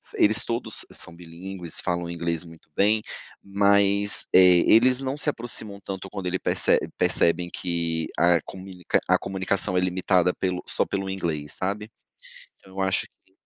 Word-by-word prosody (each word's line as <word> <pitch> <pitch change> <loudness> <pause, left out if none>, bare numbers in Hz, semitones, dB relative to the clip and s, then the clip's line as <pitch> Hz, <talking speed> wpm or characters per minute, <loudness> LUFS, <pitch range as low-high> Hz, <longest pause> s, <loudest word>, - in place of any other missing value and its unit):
eles 110 +1 +3
todos 120 +1 +2
são 85 - -7
bilíngues, 85 +1 -5
falam 85 -1 -2
inglês 85 0 -2
muito 80 -2 -16
bem, 105 +2 +3 0.4
mas, 100 0 +2
eh, 90 -2 +6
eles 125 +3 +5
não 135 0 -3
se 150 - +1
aproximam 115 -6 -4
tanto 95 0 -7
quando 100 -2 -7
ele 90 +1 -2
perce - - +2 0.2
percebem 85 +1 +1
que 85 -2 -2
a 85 -1 +4
comunic 95 -1 -11 0.2
a - - +4
comunicação 95 -1 0
é - - +3
limitada 90 0 +1
pelo 90 -1 -3
só - - +1
pelo 95 0 -4
inglês, 80 -6 -3
sabe. 100 +3 -4 0.7
Então 95 - -18
eu 95 - -4
acho 95 0 0 0.2
que - - -32
95 Hz, 155 wpm, -24 LUFS, 85-100 Hz, 0.7 s, eh